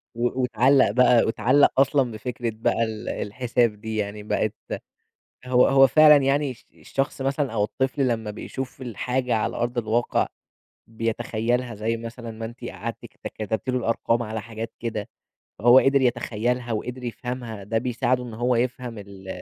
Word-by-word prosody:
و 120 +2 0
واتعلق 125 0 +4
بقى 125 0 +5
واتعلق 120 +6 +4
أصلًا 135 -2 +3
بفكرة 115 +2 -4
بقى 115 +1 +1
ال 110 -1 -4
الحساب 115 -1 -1
دي 110 0 -4
يعني، 105 0 -3
بقت 105 0 0 0.9
هو 125 0 +4
هو 135 0 +6
فعلًا 150 +2 +7
يعني 140 +1 +1
الش 125 - -14
الشخص 135 0 -3
مثلًا 135 -1 -1
أو 105 -2 +1
الطفل 130 +5 0
لما 110 -3 -1
بيشوف 130 +5 -7
الحاجة 125 +1 -1
على 110 - -1
أرض 120 +1 -2
الواقع، 115 +1 +1 0.6
بيتخيلها 115 +1 -2
زي 110 +2 -1
مثلًا 115 0 -7
ما 110 0 -6
أنتِ 120 +2 -9
قعدتِ 115 +2 -6
كت - - -9
كتبتِ 110 +3 -2
له 130 - +1
الأرقام 115 0 0
على 110 -1 -4
حاجات 115 0 -7
كده. 110 -3 -4 0.5
هو 120 +3 +7
قدر 135 0 +3
يتخيلها 120 0 0
وقدر 125 +3 -4
يفهمها 120 -3 -5
ده 110 +3 -1
بيساعدُه 125 +1 0
إن 120 -2 -8
هو 120 +3 +1
يفهم 120 -1 -2
ال 100 -2 -11
120 Hz, 160 wpm, -24 LUFS, 110-125 Hz, 0.9 s, فعلًا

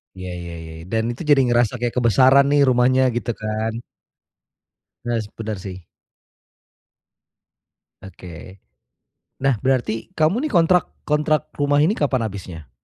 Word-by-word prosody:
Ya 95 -1 -7
ya 85 -1 -7
ya 80 -1 -9
ya, - - -10
dan 110 0 0
itu 120 - -9
jadi 145 -2 +6
ngerasa 120 -2 +2
kayak 120 0 -2
kebesaran 130 +4 +5
nih 145 0 +4
rumahnya 130 +1 +3
gitu 120 0 -2
kan. 110 +1 -2 1.3
Yes, 115 -3 -2
bener 110 -2 -4
sih. 95 -1 -9 2.2
Oke. 90 0 -12 0.8
Nah, 135 -2 +3
berarti 130 -1 -1
kamu 195 - +1
nih - - -8
kontrak 175 -2 +3 0.2
kontrak 150 0 0
rumah 145 0 +2
ini 165 - +3
kapan 135 - 0
habisnya? 90 - -9
120 Hz, 130 wpm, -21 LUFS, 100-145 Hz, 2.2 s, jadi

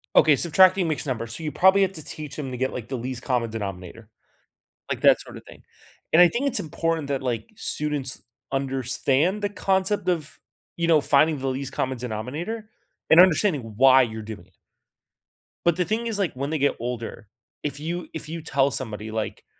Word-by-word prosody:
Okay, 155 -2 +6
subtracting 185 +4 +4
mixed 155 -1 -2
numbers, 115 -2 -3
so - - -8
you 155 -1 -3
probably 190 +7 +5
have 195 -1 +2
to 155 - -5
teach 150 0 -7
them 140 -4 -5
to 125 - -5
get, 130 +1 -1
like, 120 -3 -6
the 135 - -4
least 125 0 -5
common 125 -4 0
denominator, 100 0 -7 0.8
like, - - -3
that - - +5
sorta - - -10
thing, - - -16 0.5
and 165 - +6
I - - +8
think 245 +10 -1
it's 275 - +2
important 165 -1 -2
that, 140 -2 -2
like, 125 - -3
students 150 -9 -3 0.3
understand 135 - 0
the 205 - +1
concept 195 0 0
of, 155 -4 -3 0.4
you 170 -1 -1
know, 160 -3 +5
finding 150 +2 +3
the 135 0 -4
least 135 +1 -4
common 130 -2 -2
denominator 140 - -5 0.4
and 160 - +8
understanding 180 -3 +5 0.2
why 130 +1 +7
you're 110 -3 -3
doing 110 -1 -9
it. - - -32 1.1
But 170 -1 +3
the 180 - +1
thing 225 +6 -1
is, 220 -3 -2
like, 195 -4 0
when 135 +2 -4
they 160 - -1
get 140 0 +1
older, 115 -3 -5 0.4
if 145 -1 -4
you 170 +3 -4
if 155 -1 -6
you 165 +1 -6
tell 140 -2 +1
somebody, 110 -4 -3
like, 110 -1 -4
145 Hz, 195 wpm, -24 LUFS, 125-170 Hz, 1.1 s, I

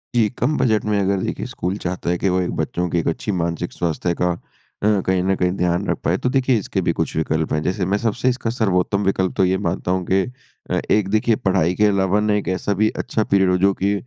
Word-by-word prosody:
जी। 110 -3 +3
कम 145 +5 +1
budget 110 -4 +2
में 105 -1 +1
अगर 100 0 +1
देखिए, - - -3
स्कूल 90 +2 -3
चाहता 90 -2 -3
है 90 - +1
कि 95 - 0
वो 90 0 +1
एक 90 - -2
बच्चों 90 0 -1
की 85 - +1
एक - - -2
अच्छी 85 +6 -1
मानसिक 85 -1 -2
स्वास्थ्य 85 +1 -1
का 90 - +3 0.5
अ, - - +3 0.2
कहीं 95 -1 +1
न 95 0 +2
कहीं 90 -1 +1
ध्यान 90 +2 0
रख - - 0
पाए - - +1
तो 130 - -1
देखिए 130 -3 +2
इसके 100 - -2
भी - - +1
कुछ - - -1
विकल्प 80 0 0
हैं। 75 - +1
जैसे 90 0 -1
मैं 100 +2 +1
सबसे 115 +3 0
इसका 125 -2 -2
सर्वोत्तम 100 -3 +1
विकल्प 95 -1 +1
तो 95 - +4
ये 95 +1 +2
मानता 90 +1 -2
हूँ 90 -1 0
कि 95 0 +4 0.5
अ, - - +1
एक 105 -3 +3
देखिए 110 +2 +2
पढ़ाई 90 -3 +1
के 105 - +3
अलावा 100 0 +2
ना 105 0 +1
एक 105 - -2
ऐसा 100 - -1
भी 110 +2 +2
अच्छा 110 - -2
पीरियड 95 -2 +2
हो 90 - +3
जो 100 +1 +3
कि 100 - +3
95 Hz, 250 wpm, -21 LUFS, 90-105 Hz, 0.5 s, तो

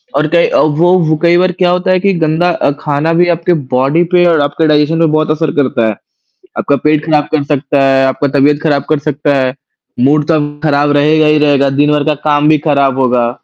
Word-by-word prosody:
और 155 - 0
कई 170 0 +3
अ, - - -1
वो 160 +4 +2 0.2
वो 155 - +2
कई 170 0 +3
बार 185 +1 +1
क्या 180 0 -1
होता 180 +1 -1
है 185 - +2
कि 195 +1 0
गंदा 160 +3 0
अ, 155 - -1
खाना 150 +3 -2
भी 175 +1 +2
आपके 175 +2 -1 0.2
बॉडी 135 +7 +1
पे 175 0 +4
और 160 -3 +1
आपके 145 +3 -1
डाइजेशन 150 +2 +1
पे 165 - +3
बहुत 155 0 0
असर 155 -1 -1
करता 120 -4 -1
है। 110 - -2 0.6
आपका 140 - 0
पेट 150 0 +1
ख़राब 150 -2 0
कर 155 -2 0
सकता 140 -1 -1
है, 135 0 +2
आपका 135 +2 -1
तबीयत 145 +2 +1
ख़राब 145 -3 0
कर 155 -1 0
सकता 145 0 -1
है, 130 -1 -1 0.5
मूड 145 +3 +1
तो 165 - +2
आपका 145 0 -3
ख़राब 145 0 +1
रहेगा 155 +2 +2
ही 150 0 +2
रहेगा, 140 -2 +1
दिन 145 +2 +1
भर 150 -1 0
का 155 0 0 0.2
काम 145 0 +1
भी 155 0 +3
ख़राब 140 -2 +1
होगा। 125 -2 0
150 Hz, 230 wpm, -12 LUFS, 140-160 Hz, 0.6 s, पे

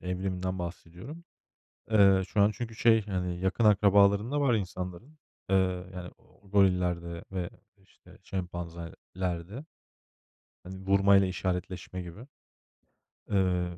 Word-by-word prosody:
evriminden 90 0 -3
bahsediyorum. 90 - -8 0.7
Eee, 100 -3 +6
şu 100 - +1
an 105 +1 +5
çünkü 115 0 -6
şey, 115 -3 +4
yani, 90 -3 -2
yakın 95 +4 0
akrabalarında 100 +6 +4
var 130 -4 +3
insanların. 95 - -4 0.3
Eee, 95 - +3 0.4
yani, 90 -1 -7 0.3
gorillerde 90 -4 +1
ve, 90 -2 -3 0.3
işte, - - -20
şempanzelerde. 90 - -5 1.0
Hani, 95 +1 -9
vurmayla 100 0 +5
işaretleşme 90 0 -4
gibi. 90 +9 -10 1.0
Iıı, 90 -3 0
95 Hz, 100 wpm, -29 LUFS, 90-100 Hz, 1.0 s, Eee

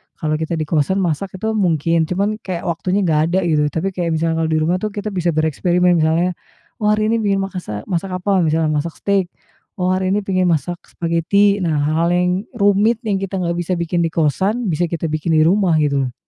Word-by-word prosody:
kalau 155 -1 -1
kita 160 +1 -3
di 160 - -1
kosan 160 +5 0
masak 180 +2 -2
itu 220 +4 -2
mungkin, 165 -3 +1
cuman 200 +5 -1
kayak 185 -5 -5
waktunya 185 +4 -1
nggak 155 -4 +2
ada 190 - +3
gitu, 155 -3 +2
tapi 160 +6 -2
kayak 175 -3 -2
misalnya 165 0 0
di 160 0 +1
rumah 170 +4 +1
tuh 210 +2 -4
kita 210 +1 -4
bisa 175 -4 -1
bereksperimen 175 +3 +2
misalnya, 165 +3 +2 0.5
"Oh 210 - 0
hari 215 0 +1
ini 230 - +2
bikin 200 -2 +1
makasa 180 - -5
masak 185 +1 -2
apa?" 195 0 +2
Misalnya 160 0 +1
masak 155 +2 -2
steak, 195 -2 0 0.5
"Oh 180 -2 -1
hari 185 0 0
ini 205 - +1
pingin 185 -2 0
masak 170 +1 0
spageti." 175 +5 +1
Nah 160 -2 0
hal-hal 160 +3 +1
yang 180 0 +2 0.3
rumit 205 +2 +2
yang 210 -3 0
kita 195 0 -4
nggak 170 -1 -1
bisa 175 +1 -2
bikin 170 0 0
di 165 - -3
kosan, 190 - 0
bisa 170 +1 0
kita 165 -1 -3
bikin 155 +2 -1
di 155 - +4
rumah 185 0 +3
gitu 140 -2 +1
loh. 125 - -9
175 Hz, 210 wpm, -19 LUFS, 160-195 Hz, 0.5 s, di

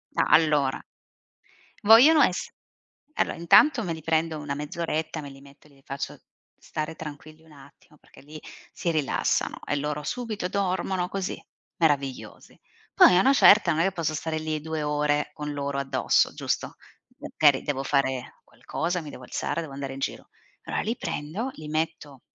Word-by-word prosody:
Ah - - +2
allora 150 -4 +2 1.1
vogliono 255 +9 +8
ess 180 - 0 0.7
allora, - - 0
intanto 230 - +5
me 180 - -3
li 160 - -8
prendo 160 0 0
una 145 -1 -4
mezz'oretta, 155 +1 -3
me 145 - -8
li 135 0 -14
metto, 140 +2 -18
glieli 140 -2 -23
faccio 140 +1 -6 0.4
stare 155 +1 -5
tranquilli 155 +1 -10
un 160 - -20
attimo 140 +1 -18
perché - - -19
lì 150 +3 -11 0.3
si 170 - -2
rilassano 155 -4 -1
e 145 - -1
loro 150 +1 -3
subito 220 0 -4
dormono 185 -1 -1
così, 195 -1 -4 0.4
meravigliosi. 140 -5 -1 0.4
Poi 180 - +7
a - - +6
una 265 +8 +4
certa 210 -8 +6
non 160 0 +1
è - - +3
che 195 - +1
posso 165 -4 -2
stare 160 +1 -3
lì 155 -1 -3
2 160 -1 -4
ore 150 0 0
con 150 -1 -5
loro 140 -1 -3
addosso, 140 -1 +1
giusto, - - -3 0.4
magari 145 -3 +2
devo 135 -2 -2
fare 135 -2 -1
qualcosa, 175 +2 -4
mi 155 - -9
devo 130 - -11
alzare, 125 - -3
devo 155 -4 -8
andare 135 -1 -5
in 135 - -8
giro. - - -5 0.3
Allora - - -3
li 225 +3 -2
prendo, 165 - -4
li 155 - -9
metto 155 -3 -4
155 Hz, 165 wpm, -26 LUFS, 145-170 Hz, 1.1 s, vogliono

